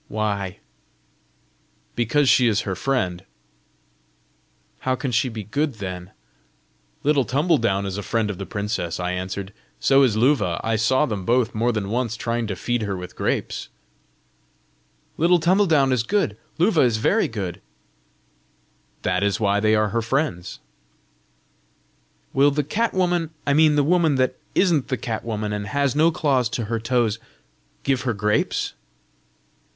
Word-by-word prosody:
"Why?" 100 Hz, -5 st, -2 dB, 1.4 s
"Because 120 Hz, +5 st, +2 dB
she 125 Hz, -1 st, +5 dB
is 110 Hz, -2 st, +2 dB
her 95 Hz, -, -3 dB
friend." 95 Hz, -7 st, -1 dB, 1.6 s
"How 130 Hz, 0 st, 0 dB
can 130 Hz, 0 st, -3 dB
she 125 Hz, +3 st, +1 dB
be 110 Hz, -2 st, -6 dB
good 140 Hz, +6 st, -1 dB
then?" 90 Hz, -3 st, -6 dB, 0.9 s
"Little 145 Hz, -2 st, +3 dB
Tumbledown 125 Hz, -, +1 dB
is 100 Hz, +1 st, -3 dB
a -, -, -3 dB
friend 110 Hz, 0 st, -1 dB
of 95 Hz, -, -8 dB
the 100 Hz, -, -5 dB
princess," 100 Hz, -5 st, -3 dB
I 90 Hz, 0 st, -1 dB
answered; 95 Hz, +2 st, -4 dB, 0.3 s
"so 135 Hz, 0 st, +4 dB
is 120 Hz, -6 st, +3 dB
Luva: 115 Hz, -8 st, +2 dB
I 115 Hz, 0 st, 0 dB
saw 130 Hz, +6 st, +2 dB
them 105 Hz, -8 st, -4 dB
both, 120 Hz, +3 st, +1 dB
more 115 Hz, +3 st, +1 dB
than 105 Hz, -4 st, -3 dB
once, 115 Hz, -1 st, -1 dB
trying 115 Hz, 0 st, -2 dB
to 100 Hz, -, -3 dB
feed 120 Hz, +5 st, -2 dB
her 100 Hz, -3 st, -2 dB
with 90 Hz, 0 st, -8 dB
grapes!" -, -, -2 dB, 1.5 s
"Little 175 Hz, +2 st, +4 dB
Tumbledown 165 Hz, -6 st, +3 dB
is 125 Hz, -3 st, +2 dB
good! 135 Hz, -, 0 dB, 0.2 s
Luva 175 Hz, -1 st, +3 dB
is 120 Hz, -3 st, +2 dB
very 110 Hz, -, +2 dB
good!" 100 Hz, -6 st, -5 dB, 1.4 s
"That 90 Hz, +1 st, 0 dB
is 100 Hz, -2 st, +1 dB
why 100 Hz, -1 st, +2 dB
they 110 Hz, +1 st, +3 dB
are 110 Hz, -1 st, +2 dB
her 115 Hz, +3 st, 0 dB
friends." 115 Hz, -, -2 dB, 1.8 s
"Will 140 Hz, +2 st, +5 dB
the 145 Hz, +1 st, 0 dB
cat 220 Hz, -, -1 dB
woman 175 Hz, -3 st, +1 dB, 0.2 s
I 140 Hz, -, +2 dB
mean 155 Hz, 0 st, +5 dB
the 145 Hz, -, +3 dB
woman 165 Hz, -1 st, +3 dB
that 130 Hz, -1 st, +1 dB, 0.2 s
isn't 170 Hz, -8 st, +2 dB
the 130 Hz, -, -1 dB
cat 115 Hz, -2 st, -4 dB
woman, 105 Hz, -2 st, -3 dB
and 105 Hz, 0 st, -4 dB
has 140 Hz, +2 st, 0 dB
no 160 Hz, +2 st, +5 dB
claws 135 Hz, -7 st, +1 dB
to 120 Hz, -, -2 dB
her 115 Hz, +2 st, -2 dB
toes 115 Hz, -2 st, 0 dB, 0.6 s
give 135 Hz, -3 st, +1 dB
her 120 Hz, -1 st, -1 dB
grapes?" 105 Hz, +1 st, 0 dB
115 Hz, 155 wpm, -23 LUFS, 105-140 Hz, 1.8 s, she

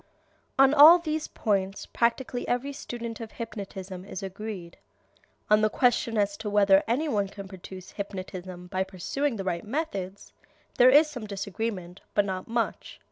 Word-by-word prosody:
On 270 Hz, +1 st, +6 dB
all 305 Hz, +4 st, +10 dB
these 315 Hz, -2 st, -3 dB
points 195 Hz, -2 st, -1 dB
practically 245 Hz, +1 st, -1 dB
every 260 Hz, +3 st, -1 dB
student 235 Hz, -4 st, -6 dB
of 225 Hz, -2 st, -8 dB
hypnotism 195 Hz, -4 st, -7 dB
is 195 Hz, -1 st, -7 dB
agreed. 190 Hz, -2 st, -7 dB, 0.7 s
On 210 Hz, 0 st, +5 dB
the 215 Hz, -, +3 dB
question 235 Hz, -1 st, +2 dB
as 200 Hz, -1 st, +1 dB
to 220 Hz, -1 st, -4 dB
whether 200 Hz, -1 st, +5 dB
any 260 Hz, +8 st, +1 dB
one 205 Hz, -8 st, 0 dB
can 195 Hz, 0 st, -9 dB
produce 185 Hz, 0 st, -10 dB
hypnotism 185 Hz, -3 st, -7 dB
by 185 Hz, +1 st, -1 dB
pursuing 215 Hz, +9 st, -2 dB
the 195 Hz, -, -4 dB
right 175 Hz, -2 st, -2 dB
methods 205 Hz, -, -4 dB, 0.5 s
there 250 Hz, +1 st, +8 dB
is 295 Hz, +4 st, +7 dB
some 250 Hz, -8 st, -7 dB
disagreement, 200 Hz, -2 st, -4 dB
but 205 Hz, -, +4 dB
not 185 Hz, -2 st, -4 dB
much. 230 Hz, 0 st, -3 dB
210 Hz, 155 wpm, -27 LUFS, 190-245 Hz, 0.7 s, all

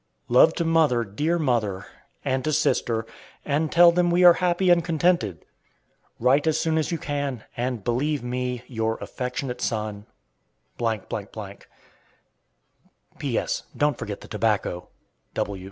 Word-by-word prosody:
Love 125 Hz, +7 st, +6 dB
to 170 Hz, -, -1 dB
mother, 160 Hz, -7 st, +3 dB
dear 150 Hz, +12 st, -1 dB
mother; 115 Hz, -, 0 dB, 0.4 s
and 130 Hz, -1 st, 0 dB
to 155 Hz, -, 0 dB
sister, 115 Hz, -6 st, +1 dB, 0.4 s
and 150 Hz, +2 st, 0 dB
tell 175 Hz, 0 st, +7 dB
them 175 Hz, 0 st, +2 dB
we 175 Hz, +1 st, +3 dB
are 175 Hz, -1 st, +10 dB
happy 180 Hz, +1 st, +2 dB
and 170 Hz, -1 st, +4 dB
contented. 160 Hz, -, 0 dB, 0.7 s
Write 135 Hz, +6 st, +3 dB
as 160 Hz, -, +2 dB
soon 160 Hz, -1 st, +1 dB
as 155 Hz, -, -2 dB
you 170 Hz, -, 0 dB
can, 145 Hz, -6 st, -3 dB
and 120 Hz, -3 st, -3 dB
believe 135 Hz, +4 st, 0 dB
me, 125 Hz, 0 st, -3 dB
Your 110 Hz, -2 st, -2 dB
affectionate 125 Hz, 0 st, -4 dB
son,. 105 Hz, -2 st, -3 dB, 0.7 s
P.S. 115 Hz, -4 st, -1 dB, 2.7 s
Don't 145 Hz, -3 st, +2 dB
forget 105 Hz, -2 st, -5 dB
the -, -, -11 dB
tobacco. 105 Hz, -5 st, -1 dB
130 Hz, 125 wpm, -24 LUFS, 115-160 Hz, 2.7 s, are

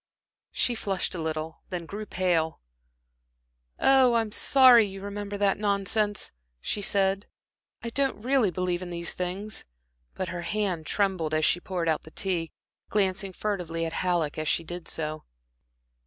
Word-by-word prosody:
She 245 Hz, -, +1 dB
flushed 195 Hz, -5 st, -2 dB
a 180 Hz, -, -4 dB
little, 160 Hz, 0 st, -4 dB
then 175 Hz, -2 st, -4 dB
grew 205 Hz, +5 st, -6 dB
pale. 170 Hz, -3 st, 0 dB, 1.2 s
"Oh, 260 Hz, -3 st, +5 dB
I'm 225 Hz, -2 st, +1 dB
sorry 255 Hz, -1 st, +7 dB
you 195 Hz, -1 st, -5 dB
remembered 205 Hz, +1 st, -5 dB
that 200 Hz, -1 st, +2 dB
nonsense," 205 Hz, 0 st, +1 dB, 0.3 s
she 205 Hz, -, -2 dB
said. 195 Hz, 0 st, +1 dB, 0.6 s
"I 235 Hz, -, -4 dB
don't 275 Hz, -1 st, 0 dB
really 250 Hz, -2 st, +2 dB
believe 180 Hz, 0 st, -2 dB
in 180 Hz, -, -6 dB
these 170 Hz, 0 st, -1 dB
things." 190 Hz, +4 st, -3 dB, 0.5 s
But 185 Hz, -, -3 dB
her 175 Hz, -1 st, -4 dB
hand 185 Hz, -3 st, -2 dB
trembled 185 Hz, -6 st, 0 dB
as 155 Hz, 0 st, +2 dB
she 175 Hz, -, +3 dB
poured 175 Hz, -2 st, -3 dB
out 155 Hz, -1 st, +1 dB
the -, -, -13 dB
tea, 170 Hz, -2 st, -1 dB, 0.4 s
glancing 195 Hz, -1 st, 0 dB
furtively 175 Hz, -5 st, -3 dB
at 165 Hz, -, -4 dB
Halleck 170 Hz, -5 st, 0 dB
as 155 Hz, -, -3 dB
she 165 Hz, -, +1 dB
did 175 Hz, +1 st, -7 dB
so. 155 Hz, -1 st, -4 dB
190 Hz, 155 wpm, -27 LUFS, 170-205 Hz, 1.2 s, sorry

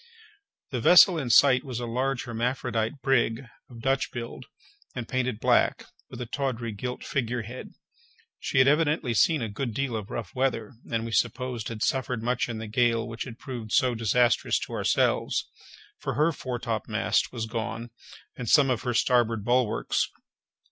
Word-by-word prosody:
The 125 Hz, -3 st, -2 dB
vessel 180 Hz, +4 st, +7 dB
in 130 Hz, -5 st, -3 dB
sight 130 Hz, +1 st, +6 dB
was 125 Hz, -4 st, -5 dB
a 120 Hz, -, -3 dB
large 125 Hz, +2 st, -1 dB
hermaphrodite 120 Hz, +1 st, -2 dB
brig, 120 Hz, -3 st, +2 dB, 0.3 s
of 120 Hz, -, -12 dB
a -, -, -10 dB
Dutch 135 Hz, +2 st, 0 dB
build, 120 Hz, +2 st, -7 dB, 0.5 s
and 120 Hz, -2 st, -5 dB
painted 130 Hz, -4 st, -1 dB
black, -, -, +2 dB, 0.2 s
with 125 Hz, -, -9 dB
a 125 Hz, -, -3 dB
tawdry 125 Hz, -2 st, -3 dB
gilt 125 Hz, +4 st, -5 dB
figure 120 Hz, -3 st, -2 dB
head. 120 Hz, +4 st, -9 dB, 0.7 s
She -, -, -3 dB
had 130 Hz, 0 st, +6 dB
evidently 150 Hz, -4 st, +2 dB
seen 150 Hz, +4 st, +3 dB
a -, -, -1 dB
good 110 Hz, +2 st, -4 dB
deal 135 Hz, -3 st, -1 dB
of 105 Hz, -2 st, -5 dB
rough 115 Hz, -, -5 dB
weather, 130 Hz, -4 st, -1 dB, 0.2 s
and, 115 Hz, -1 st, -1 dB
we 115 Hz, -, -5 dB
supposed, 120 Hz, 0 st, -1 dB
had 110 Hz, -2 st, -4 dB
suffered 125 Hz, -3 st, -1 dB
much 125 Hz, +1 st, 0 dB
in 115 Hz, -, -4 dB
the 110 Hz, -, -5 dB
gale 115 Hz, +1 st, +1 dB
which 115 Hz, +2 st, -5 dB
had 120 Hz, -3 st, -9 dB
proved 120 Hz, -6 st, -7 dB
so 130 Hz, -3 st, +3 dB
disastrous 120 Hz, +2 st, +2 dB
to -, -, -6 dB
ourselves; -, -, +1 dB, 0.5 s
for -, -, -3 dB
her 155 Hz, +3 st, +3 dB
foretopmast 115 Hz, -5 st, -1 dB
was 115 Hz, -3 st, -3 dB
gone, 115 Hz, +1 st, -4 dB, 0.4 s
and 120 Hz, -3 st, -5 dB
some 140 Hz, -3 st, +5 dB
of 120 Hz, -, -1 dB
her 125 Hz, -2 st, -2 dB
starboard 115 Hz, -4 st, +2 dB
bulwarks. 120 Hz, -2 st, +1 dB
120 Hz, 170 wpm, -27 LUFS, 115-130 Hz, 0.7 s, vessel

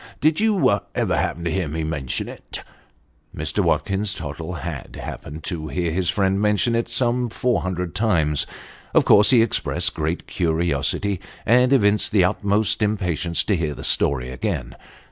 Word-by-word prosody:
Did 155 Hz, +1 st, +2 dB
you] 205 Hz, -, +3 dB, 0.2 s
ever -, -, +1 dB
happen 85 Hz, -, -2 dB
to 85 Hz, -, -1 dB
hear 90 Hz, -1 st, -1 dB
me 80 Hz, +2 st, -3 dB
mention 75 Hz, -5 st, -3 dB
it? -, -, -9 dB, 0.4 s
" 75 Hz, +1 st, -26 dB
Mr. 80 Hz, 0 st, -2 dB
Watkins 100 Hz, +1 st, 0 dB
Tottle 80 Hz, +3 st, -6 dB
had 80 Hz, -5 st, -6 dB
happened 75 Hz, +3 st, -8 dB
to 80 Hz, -4 st, -4 dB
hear 85 Hz, +1 st, -2 dB
his 90 Hz, +1 st, 0 dB
friend 95 Hz, 0 st, +1 dB
mention 105 Hz, +3 st, +2 dB
it 115 Hz, 0 st, 0 dB
some 125 Hz, -1 st, +1 dB
four 125 Hz, +2 st, 0 dB
hundred 90 Hz, -2 st, -3 dB
times. 85 Hz, -9 st, +1 dB, 0.5 s
Of -, -, +5 dB
course 105 Hz, +1 st, +6 dB
he 120 Hz, -4 st, +6 dB
expressed 115 Hz, -, 0 dB
great 80 Hz, +3 st, -3 dB
curiosity, 85 Hz, +3 st, 0 dB, 0.2 s
and 125 Hz, +3 st, +4 dB
evinced 105 Hz, -7 st, +3 dB
the 100 Hz, -4 st, +5 dB
utmost 105 Hz, +3 st, +1 dB
impatience 90 Hz, -5 st, +1 dB
to 100 Hz, -, +1 dB
hear 75 Hz, -4 st, -2 dB
the -, -, -9 dB
story 65 Hz, -3 st, +1 dB
again. 65 Hz, -1 st, -3 dB
90 Hz, 165 wpm, -22 LUFS, 80-105 Hz, 0.5 s, course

